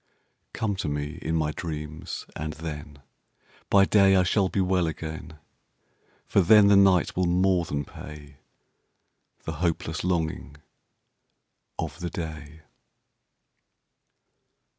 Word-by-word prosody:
Come 105 -3 -1
to - - -3
me 75 +3 -4
in 80 +1 -2
my 75 -2 0
dreams, 75 +1 -6
and 80 0 -4
thenBy 75 +5 -3
day 100 -2 +5
I 95 - +4
shall 95 +1 +2
be 100 - -2
well 90 -2 +2
again. 80 0 -6 0.9
For - - +3
then 100 +3 +6
the 100 - +6
night 95 -3 +4
will 90 -1 +1
more 90 0 +2
than 70 -2 -3
payThe 75 0 -11 1.1
hopeless 80 0 -2
longing 80 -5 -2 1.2
of - - -5
the 90 -1 -3
day. 80 -2 -7
80 Hz, 110 wpm, -26 LUFS, 75-95 Hz, 1.2 s, then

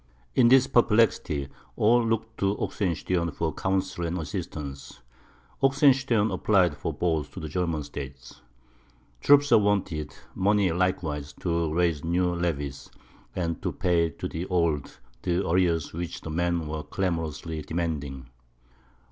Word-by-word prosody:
In 120 - +5
this 130 +1 +6
perplexity, 105 - +2 0.3
all 120 +3 +4
looked 115 0 -2
to 100 +1 +1
Oxenstiern 90 -2 -1
for 80 +2 -2
counsel 95 -2 -1
and 85 +1 -2
assistance; 75 - -6 0.6
Oxenstiern 135 -5 +3
applied 90 -7 +3
for - - -3
both 80 -4 -1
to - - -7
the 80 - -5
German 85 -1 -1
States. 70 -3 -9 0.8
Troops 145 0 +5
were - - +8
wanted; 95 -7 0 0.2
money 100 -1 +2
likewise, 80 -5 -1
to 85 -3 0
raise 85 -3 +1
new 90 +1 +1
levies, 75 -6 -3 0.5
and 85 -3 -2
to - - -1
pay 85 -2 +1
to 70 - -6
the 85 +3 -5
old 85 -6 0 0.2
the 90 +1 0
arrears 85 -2 +1
which 85 +1 -5
the 80 - -6
men 85 0 0
were 75 0 -3
clamorously 80 -3 -3
demanding. 75 -5 -3
85 Hz, 130 wpm, -26 LUFS, 75-95 Hz, 0.8 s, were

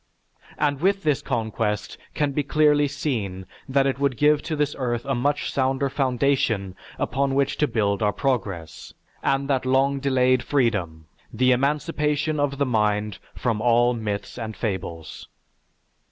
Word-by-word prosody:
And 145 -1 0
with 195 +2 +2
this 150 -3 +1
conquest 110 -4 -2 0.2
can 145 -1 +1
be 150 - 0
clearly 145 0 +3
seen 115 -10 -3 0.2
that 135 +1 +3
it 135 -1 0
would 140 -4 0
give 150 0 +4
to 160 - -3
this 150 -1 0
earth 120 -2 -2
a 135 - 0
much 140 +4 -1
sounder 135 +1 +1
foundation 125 -8 0 0.2
upon 135 +2 0
which 140 0 +1
to 150 - +2
build 100 -4 0
our 105 -1 +3
progress, 100 - -3 0.3
and 135 0 0
that 135 -2 +1
long 135 +2 +2
delayed 130 -2 +2
freedom, 105 - 0 0.3
the 130 0 +2
emancipation 150 +3 0
of 140 -1 0
the 140 - +1
mind 105 -4 0 0.2
from 115 -4 -1
all 120 +1 +4
myths 105 0 -4
and 110 -2 -5
fables. 85 -7 -5
130 Hz, 150 wpm, -24 LUFS, 110-140 Hz, 0.3 s, give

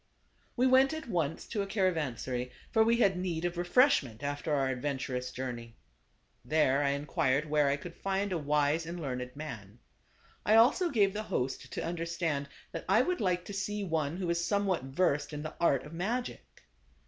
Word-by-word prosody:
We 250 - +2
went 260 +2 +5
at 315 - -7
once 165 -7 -1
to 210 - -2
a 200 - -3
caravansary; 150 - -1 0.2
for 220 - +5
we 230 +1 +3
had 200 -5 +3
need 175 -2 -2
of 175 0 -1
refreshment 175 - +3
after 145 +2 -3
our 140 -2 +2
adventurous 130 -1 -2
/Avlex - - -13
j° 130 0 -2
urne - - -6
y* 115 -1 -11 0.7
There 145 -3 +2
I 140 - +2
inquired 140 0 0
where 150 -1 +3
I 140 - +3
/g\J - - -16
could 170 -1 -8
find 195 +1 -1
a 180 - 0
wise 150 +2 +1
and 175 +1 -5
learned 125 -4 -4
man. 120 -10 -8 0.7
I 215 - +4
also 265 +11 +5
gave 205 -8 +3
the 210 - -2
host 135 -11 -3
to - - -3
understand 165 -4 -2 0.2
that - - -6
I - - +5
would 360 0 -1
like 180 -2 0
to 205 - -7
see 205 +1 -2
one 160 -3 -1
who 185 - -3
was 170 0 0
somewhat 195 -6 0
versed 150 +1 0
in 150 0 -5
the 155 - -5
art 140 -6 +3
of 150 - -11
magic. 190 - -4
165 Hz, 195 wpm, -31 LUFS, 140-195 Hz, 0.7 s, went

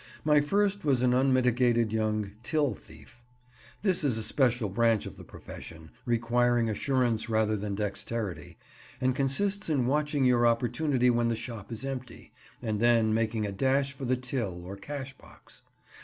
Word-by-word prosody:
My 150 -1 +5
first 200 +6 +1
was 135 -5 +2
an 125 -1 +3
unmitigated 125 -3 +2
young 110 -2 -1
"till 145 -1 0
thief." 80 +8 -16 0.6
This 185 -5 +2
is 130 -6 +1
a 110 - -3
special 120 -1 +1
branch 115 +2 +2
of - - -8
the - - -12
profession, 80 -1 -11 0.2
requiring 120 0 +2
assurance 120 -1 0
rather 110 -1 +2
than 100 -1 -3
dexterity, 100 -4 -4 0.4
and 130 -1 +1
consists 180 +10 0
in 140 -6 +1
watching 145 +1 +1
your 120 -1 +4
opportunity 125 +2 +2
when 120 0 +1
the 115 - 0
shop 110 -2 -8
is 115 +3 -4
empty, 130 -3 -7 0.3
and 110 -3 -1
then 115 -1 +3
making 110 -1 0
a 100 - -3
dash 135 +6 +1
for 135 -1 -7
the 130 +1 +1
till 115 -9 -4
or 95 +2 -7
cash 135 +6 -7
box. - - -16
120 Hz, 160 wpm, -29 LUFS, 110-135 Hz, 0.6 s, My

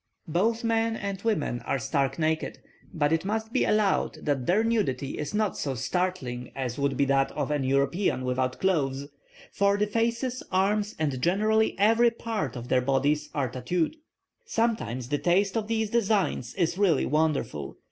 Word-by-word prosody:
"Both 225 +9 +1
men 225 0 +1
and 200 -3 -4
women 155 - 0
are - - -2
stark 135 +1 -1
naked; 160 -1 -1 0.3
but 155 -4 +1
it 165 - +1
must 220 +3 -3
be 260 - +2
allowed 210 -2 +1
that 140 -4 0
their 205 +5 +3
nudity 195 - -1
is 150 - -3
not 210 -2 0
so 135 -2 -2
startling 130 -4 -2
as 130 -1 -3
would 140 -2 0
be 140 - +3
that 135 0 +2
of 145 0 -2
an 145 -2 0
European 140 +2 +1
without 130 0 -1
clothes, 140 -7 0 0.4
for 200 0 +2
the 210 - +2
faces, 235 +4 -1
arms, 205 +3 +1
and 145 -5 -1
generally 215 +6 +2
every 225 +4 +5
part 225 - -4
of 120 0 -6
their 130 0 +3
bodies 145 +3 +1
are 140 -3 +1
tattooed. 160 - -1 0.5
Sometimes 215 - -1
the 145 0 0
taste 190 +4 +2
of 220 -2 -1
these 220 -1 -1
designs 205 - 0
is 175 0 0
really 180 -8 +3
wonderful. 140 - -1
170 Hz, 165 wpm, -27 LUFS, 135-215 Hz, 0.5 s, every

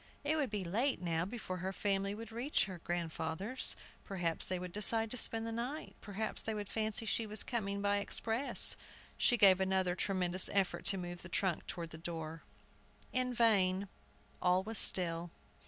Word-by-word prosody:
It 295 +2 0
would 295 -4 -1
be 205 -2 -3
late 230 +11 -1
now 170 -2 -1
before 200 -3 -6
her 185 +2 -4
family 195 0 -1
would 225 +1 -9
reach 245 +6 0
her 185 -3 -8
grandfather's. 175 +6 -2 0.3
Perhaps 175 -4 -2
they 185 - -1
would 180 0 -7
decide 225 +2 +4
to 250 - -3
spend 225 -1 0
the 230 - -4
night. 245 +7 -5
Perhaps 210 +1 -2
they 220 - -3
would 205 -2 -5
fancy 220 +1 -2
she 225 0 -1
was 215 0 -2
coming 200 -4 -3
by 205 0 +2
express. 225 +5 0 0.4
She 245 - +3
gave 190 -3 +7
another 190 -1 +1
tremendous 185 -1 +1
effort 195 -2 0
to 195 - +3
move 175 -1 -6
the 175 - -10
trunk 180 -1 -1
toward 170 -1 -6
the 160 - -9
door. 165 -1 -6 0.7
In 255 0 0
vain. 200 -5 +2 0.5
All 180 +1 +2
was 220 +1 +3
still. 170 -1 +7
195 Hz, 175 wpm, -34 LUFS, 180-225 Hz, 0.7 s, gave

